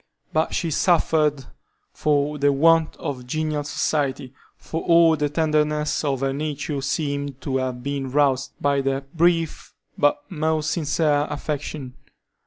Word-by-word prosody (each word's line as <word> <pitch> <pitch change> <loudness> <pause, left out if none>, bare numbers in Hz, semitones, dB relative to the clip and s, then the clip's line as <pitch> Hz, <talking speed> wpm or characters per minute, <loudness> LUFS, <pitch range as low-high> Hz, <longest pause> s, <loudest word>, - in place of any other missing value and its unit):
But 155 +1 +1
she 165 - -1
suffered 155 -5 +2 0.5
for 150 0 0
the 145 0 +4
want 160 +3 +3
of 130 -6 -6
genial 155 +1 -1
society, 140 -3 -1 0.2
for 165 - -5
all 165 -1 +5
the 150 -1 -1
tenderness 150 0 0
of 135 -3 -1
her 135 0 0
nature 145 0 -3
seemed 140 -1 -2
to 135 -2 -1
have 130 -2 -3
been 140 -1 -3
roused 135 -1 +1
by 140 -1 +1
that 135 +2 -3
brief 165 -1 +1 0.2
but 145 0 +2
most 155 -2 -1
sincere 150 -2 +1
affection. 145 -2 -4
145 Hz, 135 wpm, -23 LUFS, 140-155 Hz, 0.5 s, all